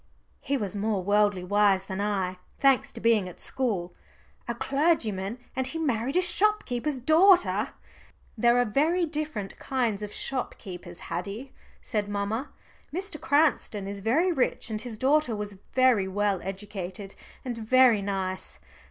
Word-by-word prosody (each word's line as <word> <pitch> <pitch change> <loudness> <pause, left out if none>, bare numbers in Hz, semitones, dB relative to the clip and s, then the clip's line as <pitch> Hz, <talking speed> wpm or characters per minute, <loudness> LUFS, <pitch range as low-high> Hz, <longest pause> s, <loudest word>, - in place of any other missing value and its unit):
He 280 - -1
was 205 -5 -3
more 205 -2 -1
worldly 205 -1 +2
wise 200 0 +3
than 195 0 -4
I, 190 -3 -1 0.2
thanks 270 -2 +3
to - - -7
being 220 -5 +2
at 180 - -13
school. 200 -9 -1 0.5
"A 235 - -2
clergyman, 235 - 0 0.2
and 260 -1 +1
he 295 - -3
married 270 -1 0
a 365 - +4
shopkeeper's 345 - +1
daughter." 345 +8 +4 0.7
"There 235 +1 +4
are 245 - +3
very 315 - +2
different 300 -10 -4
kinds 235 -6 -1
of 210 -1 -5
shopkeepers, 185 -10 -5
Haddie," 200 +10 -5 0.3
said 210 -2 -2
mamma. 205 +7 -2 0.4
"Mr. 365 0 -5
Cranston 275 -9 +1
is 200 0 -5
very 285 - +2
rich, 260 -6 0
and 215 0 -2
his 230 -2 -6
daughter 270 -1 +2
was 205 -2 -6
very 255 -7 +4
well 200 -1 0
educated 195 0 -6 0.3
and 245 -2 -3
very 235 -1 +5
nice. 190 -2 -3
220 Hz, 145 wpm, -27 LUFS, 200-270 Hz, 0.7 s, very